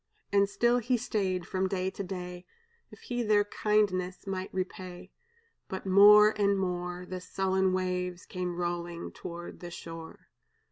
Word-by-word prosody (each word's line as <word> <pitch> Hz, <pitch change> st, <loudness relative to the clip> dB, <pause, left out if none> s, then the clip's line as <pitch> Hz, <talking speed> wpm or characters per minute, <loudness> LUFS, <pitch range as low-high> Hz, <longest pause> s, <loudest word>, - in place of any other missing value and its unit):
"And 200 Hz, 0 st, +4 dB
still 235 Hz, +5 st, +3 dB
he 245 Hz, +2 st, +1 dB
stayed 190 Hz, -6 st, -1 dB
from 190 Hz, +1 st, -1 dB
day 190 Hz, -1 st, -1 dB
to -, -, -6 dB
day, 180 Hz, -1 st, -6 dB, 0.4 s
If -, -, -15 dB
he 245 Hz, -1 st, -3 dB
their 210 Hz, -2 st, +4 dB
kindness 205 Hz, -3 st, 0 dB
might 190 Hz, -1 st, -4 dB
repay; 185 Hz, -1 st, -5 dB, 0.6 s
But 190 Hz, -, -5 dB
more 210 Hz, +2 st, +8 dB
and 200 Hz, 0 st, +3 dB
more 180 Hz, -1 st, -3 dB
The 185 Hz, 0 st, -6 dB
sullen 190 Hz, 0 st, +1 dB
waves 180 Hz, -1 st, -2 dB
came 180 Hz, -1 st, -4 dB
rolling 175 Hz, -1 st, -3 dB
toward 175 Hz, 0 st, -8 dB
the 175 Hz, -, -7 dB
shore. 165 Hz, -1 st, -9 dB
185 Hz, 145 wpm, -30 LUFS, 180-200 Hz, 0.6 s, more